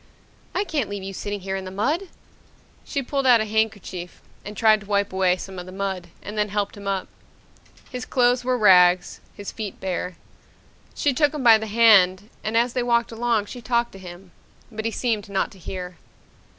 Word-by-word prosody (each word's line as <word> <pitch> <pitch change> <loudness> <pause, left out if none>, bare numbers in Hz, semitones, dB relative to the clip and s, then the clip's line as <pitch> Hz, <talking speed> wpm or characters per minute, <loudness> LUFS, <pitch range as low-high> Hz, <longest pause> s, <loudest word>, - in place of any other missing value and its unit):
"I - - +2
can't 290 - -2
leave 205 -1 -5
you 195 0 -6
sitting 205 +1 -5
here 190 +1 -3
in 190 - -4
the 185 - -6
mud!" 290 - -1 0.8
She 280 -2 -3
pulled 275 +1 -1
out 245 -2 +7
a 215 - 0
handkerchief 205 -5 -2 0.2
and 210 0 -8
tried 215 -1 +5
to 200 - -13
wipe 200 -1 0
away 185 -1 +2
some 190 0 -8
of 180 - -8
the - - -8
mud 190 -2 -4 0.2
and 205 - -7
then 210 0 0
helped 205 0 -2
him 200 -1 -9
up. 195 -1 -1 0.8
His 250 -1 -5
clothes 245 -1 +2
were 250 0 +1
rags, 180 -4 +5 0.2
his 205 -1 -7
feet 210 -4 -6
bare. 180 -1 -3 0.8
She 285 - +1
took 295 +2 +2
him 290 - -3
by 225 -2 +7
the 220 - -5
hand 205 -3 +5
and 215 +2 0
as 240 +1 +2
they 250 - 0
walked 235 -1 +1
along 230 -2 0
she 245 +4 -9
talked 235 +1 0
to 195 - -12
him. 180 0 -11 0.4
But 220 0 -5
he 225 - 0
seemed 220 -4 -2
not 195 -1 -1
to 195 - -15
hear. 180 0 -7
210 Hz, 205 wpm, -23 LUFS, 190-235 Hz, 0.8 s, out